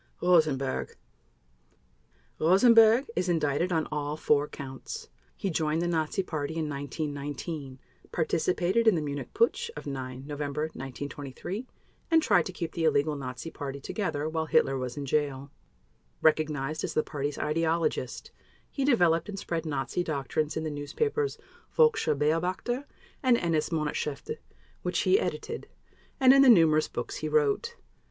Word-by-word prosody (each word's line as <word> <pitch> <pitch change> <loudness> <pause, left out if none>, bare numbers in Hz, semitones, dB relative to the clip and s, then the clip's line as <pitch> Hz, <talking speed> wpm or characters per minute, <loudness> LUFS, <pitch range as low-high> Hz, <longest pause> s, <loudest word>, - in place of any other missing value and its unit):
ROSENBERG 155 -7 +2 1.4
Rosenberg 225 - +6
is 180 0 0
indicted 160 +1 +1
on 160 -2 +1
all 150 0 -2
four 145 -1 +2
Counts. 135 -3 -8 0.3
He 195 - -2
joined 155 -1 0
the 175 - 0
Nazi 165 +3 0
Party 155 -2 -4
in 160 -2 -1
1919, 145 0 -5 0.3
participated 180 +6 +1
in 220 - +6
the 160 - 0
Munich 145 -1 -5
Putsch 465 +2 +2
of - - -7
9 130 -2 -5
November 145 0 -3
1923, 145 - -6 0.4
and 325 -1 +6
tried 180 -5 +3
to - - -5
keep 170 -2 -4
the 165 - -3
illegal 150 -1 +2
Nazi 130 +3 -6
Party 140 -1 -6
together 150 -2 -2
while 160 0 -2
Hitler 135 - +3
was 130 -1 -4
in 145 - -3
jail. 140 -1 -1 0.7
Recognized 155 -1 +1
as - - -3
the 155 - +3
Party's 145 -1 -3
ideologist, 165 +2 -1 0.4
he 275 - -2
developed 175 - +3
and 200 - -5
spread 165 -4 -3
Nazi 140 +3 -1
doctrines 150 -1 -2
in 160 - -2
the 155 - -2
newspapers 425 - -1 0.4
Völkischer 460 - +4
Beobachter 180 - 0 0.4
and 255 -4 +4
NS 165 -5 0
Monatshefte, 150 - -3 0.4
which - - 0
he 390 - +4
edited, - - -4 0.5
and 260 0 +7
in 275 - +7
the 270 - +7
numerous 160 -7 +6
books - - -5
he - - -3
wrote. 455 +1 +1
155 Hz, 145 wpm, -28 LUFS, 145-185 Hz, 1.4 s, and